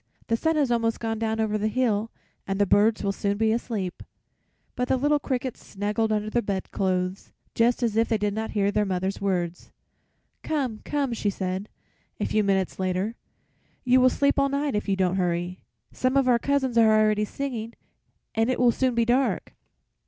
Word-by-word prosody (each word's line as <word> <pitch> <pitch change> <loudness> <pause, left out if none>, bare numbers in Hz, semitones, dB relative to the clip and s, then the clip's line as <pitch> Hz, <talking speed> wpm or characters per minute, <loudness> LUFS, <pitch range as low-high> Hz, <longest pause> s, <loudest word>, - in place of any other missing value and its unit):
The 230 - +3
sun 320 +7 +1
has 285 -5 +2
almost 230 -1 +1
gone 225 -1 -2
down 220 0 -1
over 215 -1 0
the 215 - 0
hill 225 -2 0 0.4
and 195 0 -1
the 205 - +3
birds 210 +3 +3
will 200 - +1
soon 200 +1 -1
be 220 0 +2
asleep." 215 -5 -3 0.7
But 250 - -1
the 260 - +2
little 290 +3 +2
crickets 260 -3 -3
snuggled 210 +2 -1
under 210 0 0
the 240 - +2
bedclothes 190 -2 -2 0.2
just 235 +2 +2
as 225 -3 0
if 225 +1 +2
they 225 - +2
did 205 -1 -1
not 220 +1 -3
hear 200 0 +2
their 210 - +1
mother's 190 0 -2
words. 180 -3 -2 0.7
"Come, 265 -8 -2
come," 280 -4 -1
she 215 -2 -1
said, 190 +1 -3 0.5
a - - 0
few 215 - +1
minutes 190 -2 0
later, 185 +3 -1 0.7
"you 255 0 +4
will 255 - +6
sleep 280 +3 +1
all 275 0 +3
night 280 +1 -1
if 210 0 -2
you 195 - +2
don't 185 -1 +1
hurry. 175 0 -1 0.3
Some 255 +1 0
of 270 -2 +3
our 240 -2 +4
cousins 265 -3 +1
are 220 -1 +5
already 215 -1 +3
singing, 235 -1 -4 0.6
and 225 +2 +1
it 255 - 0
will 245 -1 +5
soon 255 +1 0
be 235 -1 +2
dark." 255 +3 +1
220 Hz, 190 wpm, -25 LUFS, 200-250 Hz, 0.7 s, will